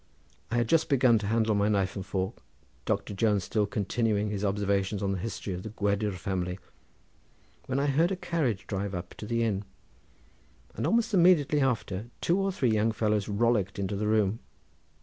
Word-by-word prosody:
I 115 - -2
had 120 -1 +2
just 160 +5 +2
begun 130 -5 +4
to 105 - -4
handle 110 0 +2
my 100 0 +2
knife 100 -3 +1
and 100 - -4
fork, 95 +2 -3 0.5
Doctor - - -1
Jones 100 -1 +1
still 105 +3 0
continuing 105 0 0
his 100 -1 -3
observations 100 0 0
on 100 - 0
the 95 - -2
history 100 -1 -4
of 90 - -5
the 110 - -6
Gwedir 100 -1 -1
family, 90 -1 -3 1.1
when 130 - -1
I 140 - +1
heard 150 +5 +3
a - - 0
carriage 160 - -1
drive 100 -1 -3
up 90 0 -6
to 105 - -6
the 115 +1 0
inn, 105 -3 0 1.1
and - - -2
almost 230 -1 +1
immediately 170 -6 +4
after 115 -5 -1
two 175 +3 +1
or 195 0 +1
three 130 -10 +1
young 110 +1 +2
fellows 105 -2 0
rollicked 105 -2 +1
into 100 0 -2
the 105 +1 -1
room. 105 0 +2
105 Hz, 185 wpm, -28 LUFS, 100-120 Hz, 1.1 s, begun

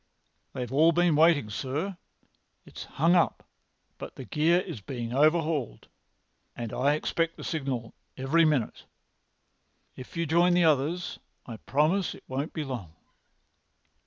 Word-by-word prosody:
"They've 125 0 -5
all 160 +4 +5
been 175 -1 +2
waiting, 150 -8 +4
sir. 145 - -3 0.7
It's - - -9
hung 165 +4 +1
up, 175 -2 +1 0.5
but - - -8
the - - -8
gear 165 +4 +2
is 115 - -7
being 120 +1 -5
overhauled, 155 - +1 0.7
and 120 -2 -6
I 140 +3 +2
expect 165 +2 -1
the - - -9
signal 135 -7 -3 0.2
every 135 +6 +2
minute. 150 -7 0 1.1
If 130 +5 -10
you 170 - 0
join 175 +3 +3
the 175 -1 +4
others 155 +4 0 0.3
I 115 -3 -8
promise 155 - 0
it - - -16
won't 135 +5 -3
be 155 - -4
long." 115 - -7
150 Hz, 135 wpm, -28 LUFS, 130-165 Hz, 1.1 s, all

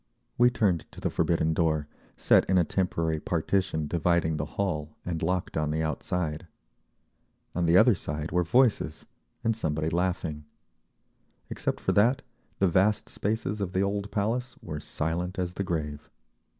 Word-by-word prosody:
We 120 +1 +5
turned 105 -9 0
to - - -10
the - - -1
forbidden 80 -2 +1
door, 80 -3 +1 0.3
set - - +5
in 95 - +4
a 90 - +5
temporary 85 -3 0
partition 85 -1 0
dividing 85 0 +1
the 75 0 -3
hall 80 -6 -2
and 85 -2 -3
locked 90 +2 -1
on 75 -1 0
the 80 +1 0
outside. 80 +1 -2 1.1
On 85 0 0
the 85 +2 +6
other 120 +4 +7
side 75 -3 -4
were 90 - +2
voices, 120 +7 +2 0.4
and 115 -1 +2
somebody 80 -5 -1
laughing. 85 -4 -1 1.1
Except - - -2
for - - 0
that 120 +6 +3 0.3
the 95 - +3
vast 95 +4 +2
spaces 105 0 -2
of 95 -2 -3
the 95 - +2
old 100 0 -2
Palace 120 +5 -1
were 75 - -5
silent 80 +4 -3
as 90 -1 -2
the 100 - -2
grave. 75 -5 -3
85 Hz, 155 wpm, -28 LUFS, 80-100 Hz, 1.1 s, other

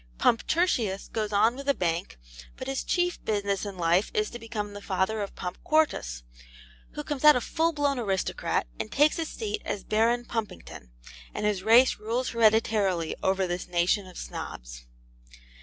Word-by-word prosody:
Pump 230 - +2
Tertius 240 - 0
goes 215 -2 -2
on 220 +4 +3
with 275 +1 -8
the 280 - +3
bank; 170 - -2 0.4
but 260 - -6
his 270 0 -2
chief 355 0 0
business 200 -1 -1
in 195 -2 -7
life 175 +3 +2
is 215 0 0
to 240 - -7
become 210 -2 -5
the 205 - -8
father 200 +2 -1
of 200 - -5
Pump 180 0 -5
Quartus, - - +1 0.7
who 295 - -5
comes 295 -2 -4
out 300 0 +9
a - - +2
full 330 +6 0
blown 285 -4 0
aristocrat, 195 -5 -1
and 110 - -4
takes 295 +4 +3
his 325 -1 -2
seat 430 -1 -4
as 195 - -4
Baron 235 +3 +1
Pumpington, 210 - -6 0.5
and - - -2
his 210 -3 +1
race 230 +5 +5
rules 230 +4 -1
hereditarily 215 -6 +2
over 190 0 +1
this 175 0 -3
nation 180 +3 +1
of 180 - -12
Snobs. - - -7
215 Hz, 175 wpm, -27 LUFS, 190-260 Hz, 0.7 s, out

